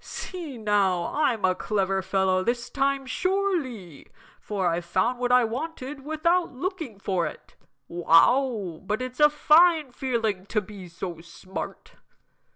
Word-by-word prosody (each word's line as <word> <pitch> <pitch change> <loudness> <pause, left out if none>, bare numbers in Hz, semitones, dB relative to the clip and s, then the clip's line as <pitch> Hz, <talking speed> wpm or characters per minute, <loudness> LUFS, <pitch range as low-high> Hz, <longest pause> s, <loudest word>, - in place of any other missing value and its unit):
See 335 -8 -7
now, 200 -5 +1
I'm 245 -9 +1
a 185 - +3
clever 195 -1 -1
fellow 190 -1 +1
this 240 +2 -2
time 275 0 0
sure 380 +5 0
ly, 200 - -10 0.3
for 195 -4 -2
I've 170 +1 0
found 210 +8 0
what 245 0 0
I 250 0 +6
wanted 270 +3 -5
without 335 +4 +1
looking 315 - -5
for 190 -3 -1
it! - - -11 0.3
Wow, 185 +2 +3
but 210 +3 -2
it's 255 +1 -6
a 295 0 +7
fine 310 -1 +4
feeling 225 -7 -2
to 215 - +1
be 200 -2 -10
so 170 0 -6
smart!" 175 +3 -8
230 Hz, 145 wpm, -26 LUFS, 190-280 Hz, 0.3 s, a